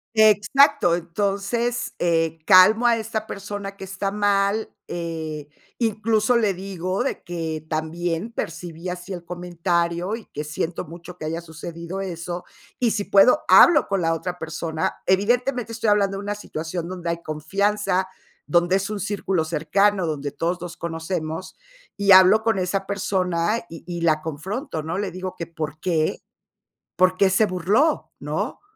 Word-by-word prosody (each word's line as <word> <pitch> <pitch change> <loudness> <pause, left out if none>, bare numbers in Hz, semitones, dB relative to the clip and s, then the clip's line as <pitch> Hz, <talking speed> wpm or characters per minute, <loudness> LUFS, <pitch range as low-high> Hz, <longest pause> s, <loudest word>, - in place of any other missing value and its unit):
exacto, 215 - +5
entonces, 200 +7 -2
eh, 165 -1 +1
calmo 210 +6 +7
a 235 - +4
esta 220 -1 -4
persona 200 0 -6
que 195 - -8
está 195 +1 -3
mal, 205 +1 +1
eh, 160 -3 -5 0.3
incluso, 220 +1 +2
le 215 -4 +2
digo 185 +3 -3
de - - -3
que: 160 -3 -4
"También 165 +6 -2
percibí 165 -2 -5
así 180 +2 -5
el 175 -1 -6
comentario, 175 +2 -1
y 230 - -11
que 150 - -6
siento 160 +3 -3
mucho 170 +2 -11
que 155 - -6
haya 165 +2 -2
sucedido 170 +2 -7
eso". 175 -1 -5 0.4
Y 240 - +3
si 210 -2 -1
puedo, 200 +9 +5
hablo 335 -4 +7
con 195 -2 -1
la 165 0 +2
otra 175 +2 -3
persona. 160 -1 -3
Evidentemente, 240 +5 +1
estoy 225 -1 0
hablando 200 -1 +2
de 195 - -5
una 205 - -2
situación 170 -3 -5
donde 180 -2 -4
hay 170 0 -3
confianza, 190 +5 0 0.4
donde 175 +4 +3
es 195 +2 -2
un 210 - -3
círculo 195 -3 -1
cercano, 180 +4 +1
donde 145 -2 -3
todos 175 +1 -2
nos 175 -1 -7
conocemos, 165 +1 -4 0.4
y 200 -1 +2
hablo 190 +3 +8
con 225 -3 +1
esa 190 +1 -1
persona, 190 0 0
y 165 - -10
y 175 -1 -4
la 155 -2 +2
confronto, 160 - -4
¿no? 165 +4 -3
Le 200 -3 -2
digo: 185 0 -6
"Que 170 - -4
por 155 -2 -5
qué 160 -2 0 0.7
por 185 +2 +3
qué 195 -1 +4
se 190 +4 +4
burló", 205 - +1
¿no? - - -3
185 Hz, 155 wpm, -23 LUFS, 165-205 Hz, 0.7 s, hablo